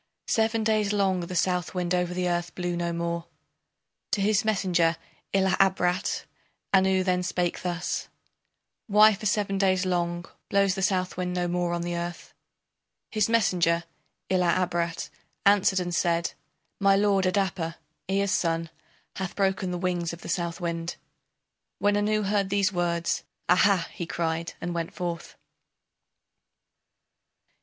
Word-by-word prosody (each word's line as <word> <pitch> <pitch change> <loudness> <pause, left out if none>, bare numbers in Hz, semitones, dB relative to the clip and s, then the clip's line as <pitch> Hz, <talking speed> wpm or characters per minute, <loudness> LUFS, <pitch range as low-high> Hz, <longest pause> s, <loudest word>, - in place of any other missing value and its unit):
Seven 225 0 +2
days 215 -1 +2
long 195 -3 +2
the 175 +1 -5
Southwind 180 0 0
over 180 -1 +1
the 180 0 -1
earth 175 0 -2
blew 175 -1 -2
no 170 0 -1
more. 170 0 -3 0.9
To - - +2
his 205 0 +3
messenger 180 -6 +2 0.3
Ila 190 -1 +3
Abrat 190 0 +1 0.5
Anu 190 -1 +4
then 180 -1 +1
spake 175 -1 -1
thus: 175 -1 -2 0.8
Why 215 +1 +7
for 215 +2 -3
seven 195 -1 0
days 190 -1 +2
long 175 -1 -1 0.2
Blows 200 -1 +3
the 190 - -4
Southwind 185 -1 0
no 175 -1 0
more 175 0 0
on 170 0 -1
the 175 0 -2
earth? 170 0 -5 0.8
His 215 -1 +1
messenger 175 -7 +2 0.5
Ila 180 -2 +3
Abrat 170 -1 -2 0.4
answered 200 -1 +4
and 175 -1 -3
said: 170 0 +1 0.5
My 195 -1 +5
lord, 195 -1 +3
Adapa, 185 -4 0 0.3
Ea's 195 0 +1
son, 165 -1 0 0.5
hath 190 -2 -4
broken 190 -1 0
the 180 - -2
wings 175 -2 -1
of 170 - -9
the - - -8
Southwind. 170 -1 -2 0.8
When 205 0 +2
Anu 210 +1 +1
heard 200 -1 +1
these 200 0 +2
words, 170 -1 0 0.2
"Aha!" 180 0 +4
he 170 - -6
cried, 165 0 -2
and 175 +1 -3
went 170 -1 -4
forth. 170 -2 -4
180 Hz, 135 wpm, -27 LUFS, 170-195 Hz, 0.9 s, Why